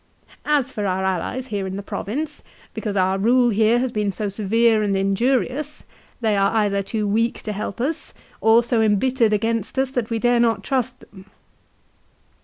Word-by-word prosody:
" -, -, -25 dB
As 270 Hz, -2 st, -2 dB
for 210 Hz, -5 st, -3 dB
our 190 Hz, 0 st, -1 dB
allies 190 Hz, +7 st, -2 dB
here 200 Hz, -2 st, -2 dB
in 190 Hz, -, -5 dB
the 200 Hz, -, -5 dB
province, 275 Hz, +9 st, -4 dB, 0.3 s
because 210 Hz, -3 st, -4 dB
our 190 Hz, 0 st, +1 dB
rule 240 Hz, +4 st, +4 dB
here 220 Hz, +2 st, +3 dB
has 250 Hz, 0 st, -1 dB
been 210 Hz, -3 st, -1 dB
so 205 Hz, +1 st, -3 dB
severe 220 Hz, +2 st, +2 dB
and 205 Hz, -2 st, 0 dB
injurious, 255 Hz, +9 st, 0 dB, 0.4 s
they 220 Hz, -2 st, +2 dB
are 195 Hz, 0 st, +2 dB
either 205 Hz, -2 st, +2 dB
too 210 Hz, +1 st, -2 dB
weak 225 Hz, +3 st, 0 dB
to 215 Hz, -, -3 dB
help 205 Hz, +2 st, -5 dB
us, 285 Hz, +7 st, -2 dB, 0.3 s
or 225 Hz, +2 st, +5 dB
so 235 Hz, -1 st, +1 dB
embittered 225 Hz, +2 st, +2 dB
against 225 Hz, +2 st, -1 dB
us 265 Hz, 0 st, +1 dB
that 245 Hz, -4 st, -2 dB
we 230 Hz, -, -1 dB
dare 240 Hz, +1 st, +2 dB
not 225 Hz, -4 st, +2 dB
trust 255 Hz, 0 st, -2 dB
them." 190 Hz, -1 st, -15 dB
220 Hz, 185 wpm, -22 LUFS, 200-245 Hz, 0.4 s, or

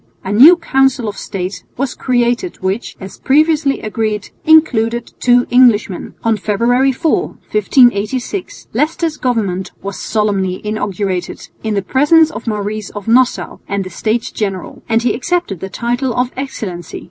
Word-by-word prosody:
A 190 Hz, -, -4 dB
new 285 Hz, -, +8 dB
Council 270 Hz, -7 st, +1 dB
of 205 Hz, -, -4 dB
State 190 Hz, -1 st, -5 dB
was 270 Hz, 0 st, -2 dB
created 245 Hz, +6 st, 0 dB
which, 190 Hz, +5 st, -3 dB
as 190 Hz, 0 st, -10 dB
previously 295 Hz, 0 st, +2 dB
agreed, 215 Hz, -1 st, -3 dB
included 240 Hz, -7 st, +3 dB
two 245 Hz, 0 st, +4 dB
Englishmen. 230 Hz, -6 st, +3 dB
On 225 Hz, -1 st, +2 dB
February 235 Hz, +6 st, +2 dB
4, 320 Hz, +5 st, 0 dB
1586, 240 Hz, -, 0 dB
Leicester's 320 Hz, 0 st, -1 dB
government 200 Hz, -8 st, -1 dB
was 200 Hz, 0 st, -5 dB
solemnly 200 Hz, -4 st, -1 dB
inaugurated 200 Hz, -3 st, -3 dB
in 220 Hz, -1 st, -2 dB
the 200 Hz, -, 0 dB
presence 310 Hz, +6 st, +4 dB
of -, -, -8 dB
Maurice 210 Hz, -1 st, -3 dB
of 205 Hz, 0 st, -9 dB
Nassau 250 Hz, +2 st, +2 dB
and 200 Hz, -1 st, -2 dB
the 185 Hz, -, -9 dB
States 220 Hz, +6 st, -2 dB
General, 195 Hz, -4 st, -4 dB
and 225 Hz, +1 st, +2 dB
he 245 Hz, -, +2 dB
accepted 270 Hz, -, -2 dB
the 190 Hz, -, -6 dB
title 240 Hz, +4 st, -2 dB
of 250 Hz, 0 st, 0 dB
"Excellency." 205 Hz, -, -6 dB
230 Hz, 145 wpm, -16 LUFS, 200-265 Hz, -, new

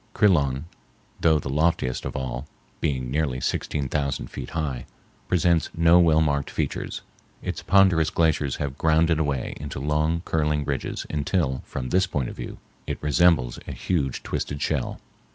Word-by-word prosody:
Crillon, 75 Hz, -8 st, +3 dB, 0.5 s
though 80 Hz, -2 st, +4 dB
the 70 Hz, -, -4 dB
loftiest 75 Hz, -4 st, +1 dB
of -, -, -4 dB
all 65 Hz, +1 st, -4 dB, 0.3 s
(being 65 Hz, -5 st, -1 dB
nearly 70 Hz, -3 st, 0 dB
sixteen 70 Hz, +2 st, -1 dB
thousand 70 Hz, 0 st, -2 dB
feet -, -, -6 dB
high), 70 Hz, -7 st, -3 dB, 0.4 s
presents 85 Hz, -3 st, +2 dB
no 85 Hz, +1 st, +6 dB
well 80 Hz, -2 st, +5 dB
marked 70 Hz, -2 st, +1 dB
features. -, -, -3 dB, 0.4 s
Its -, -, -3 dB
ponderous 95 Hz, -5 st, +4 dB
glaciers 75 Hz, -4 st, +1 dB
have 70 Hz, -1 st, -4 dB
ground 80 Hz, +1 st, +3 dB
it 80 Hz, -, +2 dB
away 70 Hz, -4 st, -1 dB
into 70 Hz, -1 st, -6 dB
long, 75 Hz, +4 st, 0 dB
curling 75 Hz, -2 st, 0 dB
ridges 70 Hz, -2 st, -3 dB
until, 75 Hz, -3 st, 0 dB
from 65 Hz, -1 st, -4 dB
this 95 Hz, +5 st, +3 dB
point 70 Hz, -8 st, -2 dB
of -, -, -8 dB
view, -, -, -7 dB, 0.3 s
it -, -, -2 dB
resembles 75 Hz, -4 st, +3 dB
a -, -, -4 dB
huge 70 Hz, -8 st, -1 dB
twisted 70 Hz, -, -3 dB
shell. -, -, -1 dB
75 Hz, 155 wpm, -25 LUFS, 70-80 Hz, 0.5 s, no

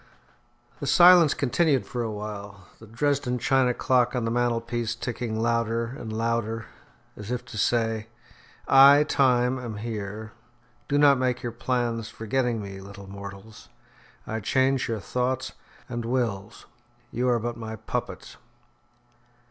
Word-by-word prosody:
The -, -, -4 dB
silence 175 Hz, -3 st, +7 dB
continued 140 Hz, +1 st, +1 dB
for 120 Hz, -, -4 dB
a 115 Hz, -, -2 dB
while, 105 Hz, -2 st, -7 dB
the 110 Hz, -, -13 dB
Dresden 130 Hz, +2 st, 0 dB
china 130 Hz, +1 st, +2 dB
clock 125 Hz, 0 st, +1 dB
on 120 Hz, -2 st, -1 dB
the 115 Hz, -, -1 dB
mantelpiece 120 Hz, -1 st, -1 dB
ticking 120 Hz, -2 st, -4 dB
louder 115 Hz, +1 st, 0 dB
and 110 Hz, -6 st, -7 dB
louder 115 Hz, 0 st, -2 dB, 0.5 s
as 105 Hz, 0 st, -9 dB
if 125 Hz, -1 st, -3 dB
to -, -, -9 dB
say, 115 Hz, -1 st, 0 dB, 0.6 s
"I, 140 Hz, +2 st, +8 dB
Time, 130 Hz, -3 st, +2 dB
am 115 Hz, -4 st, -6 dB
here. 110 Hz, -1 st, -5 dB, 0.6 s
Do 145 Hz, -, +1 dB
not 145 Hz, -2 st, +5 dB
make 125 Hz, -1 st, -1 dB
your 120 Hz, -, -3 dB
plans 120 Hz, -2 st, -2 dB
forgetting 115 Hz, 0 st, -2 dB
me, 100 Hz, -1 st, -8 dB
little 100 Hz, 0 st, -11 dB
mortals; 100 Hz, +2 st, -10 dB, 0.6 s
I 110 Hz, -, -3 dB
change 130 Hz, +4 st, +1 dB
your 115 Hz, -2 st, -2 dB
thoughts 125 Hz, +4 st, -2 dB, 0.4 s
and 120 Hz, -2 st, -4 dB
wills. 115 Hz, -4 st, -3 dB, 0.5 s
You 125 Hz, +2 st, 0 dB
are 120 Hz, -, +3 dB
but 120 Hz, +1 st, -3 dB
my 110 Hz, -1 st, -6 dB
puppets." 110 Hz, -, -5 dB
115 Hz, 140 wpm, -26 LUFS, 110-125 Hz, 0.6 s, I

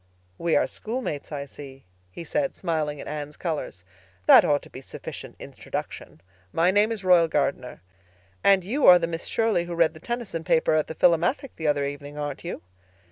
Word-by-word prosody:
"We 170 Hz, -1 st, +1 dB
are -, -, +4 dB
schoolmates, 220 Hz, -, -5 dB
I 140 Hz, -1 st, -4 dB
see," 135 Hz, -1 st, -12 dB, 0.2 s
he 130 Hz, -, -9 dB
said, 280 Hz, -, -1 dB
smiling 155 Hz, -4 st, -2 dB
at -, -, -8 dB
Anne's 150 Hz, 0 st, -6 dB
colors. 155 Hz, -, -4 dB, 0.4 s
"That -, -, +9 dB
ought 145 Hz, -1 st, +1 dB
to -, -, -14 dB
be 130 Hz, -, -9 dB
sufficient -, -, -8 dB
introduction. 80 Hz, -, -7 dB, 0.3 s
My 170 Hz, -, +3 dB
name 205 Hz, +3 st, +3 dB
is 215 Hz, -4 st, -4 dB
Royal 180 Hz, -3 st, +5 dB
Gardner. 140 Hz, -4 st, -2 dB, 0.6 s
And 195 Hz, -2 st, +5 dB
you 255 Hz, +10 st, +1 dB
are 180 Hz, -, +10 dB
the 170 Hz, -, -1 dB
Miss 165 Hz, 0 st, -5 dB
Shirley 225 Hz, -6 st, +1 dB
who 175 Hz, 0 st, -5 dB
read 165 Hz, -2 st, +3 dB
the 155 Hz, -, -13 dB
Tennyson 235 Hz, -5 st, -4 dB
paper 165 Hz, -2 st, +2 dB
at 155 Hz, -1 st, +1 dB
the 160 Hz, -, -7 dB
Philomathic 175 Hz, -, +2 dB
the 160 Hz, -, -3 dB
other 145 Hz, -1 st, +1 dB
evening, 145 Hz, +1 st, -7 dB
aren't 145 Hz, -1 st, -5 dB
you?" 175 Hz, -, -6 dB
165 Hz, 190 wpm, -25 LUFS, 145-185 Hz, 0.6 s, are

